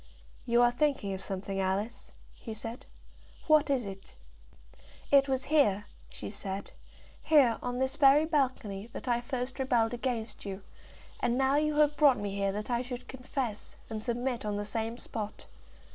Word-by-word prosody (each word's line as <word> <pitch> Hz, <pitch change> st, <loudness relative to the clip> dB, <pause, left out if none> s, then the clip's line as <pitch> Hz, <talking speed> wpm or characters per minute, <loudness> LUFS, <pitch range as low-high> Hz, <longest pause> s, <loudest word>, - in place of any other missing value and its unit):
"You 235 Hz, 0 st, +5 dB
are 240 Hz, -, +5 dB
thinking 245 Hz, -6 st, 0 dB
of 190 Hz, -, -5 dB
something, 195 Hz, 0 st, -4 dB
Alice," 195 Hz, +4 st, -2 dB, 0.2 s
he 225 Hz, -2 st, -8 dB
said. 230 Hz, +5 st, -7 dB, 0.6 s
"What 310 Hz, -1 st, +5 dB
is 260 Hz, -5 st, +1 dB
it?" 195 Hz, -1 st, -9 dB, 1.0 s
"It 275 Hz, -1 st, +6 dB
was 260 Hz, -1 st, +1 dB
here," 205 Hz, -9 st, +4 dB, 0.2 s
she -, -, -7 dB
said 200 Hz, -1 st, -5 dB, 0.5 s
"here, 265 Hz, -7 st, +4 dB
on 245 Hz, 0 st, -3 dB
this 265 Hz, +2 st, -1 dB
very 285 Hz, +2 st, +6 dB
balcony, 255 Hz, -10 st, -1 dB
that -, -, -7 dB
I 240 Hz, -1 st, +2 dB
first 250 Hz, +1 st, -4 dB
rebelled 245 Hz, -3 st, +2 dB
against 235 Hz, -3 st, -3 dB
you, 195 Hz, -1 st, -6 dB, 0.6 s
and 240 Hz, +1 st, +1 dB
now 270 Hz, +1 st, +3 dB
you 305 Hz, 0 st, +1 dB
have 295 Hz, -1 st, +3 dB
brought 285 Hz, -4 st, +6 dB
me 205 Hz, -1 st, -3 dB
here 200 Hz, 0 st, 0 dB
that 210 Hz, +4 st, -4 dB
I 240 Hz, 0 st, +1 dB
should 250 Hz, 0 st, -7 dB
confess 255 Hz, -4 st, -4 dB, 0.2 s
and 215 Hz, -1 st, -3 dB
submit 240 Hz, +1 st, -2 dB
on 210 Hz, -1 st, -2 dB
the 205 Hz, -, -3 dB
same 225 Hz, +2 st, -3 dB
spot. 215 Hz, -4 st, -6 dB
240 Hz, 165 wpm, -30 LUFS, 210-270 Hz, 1.0 s, It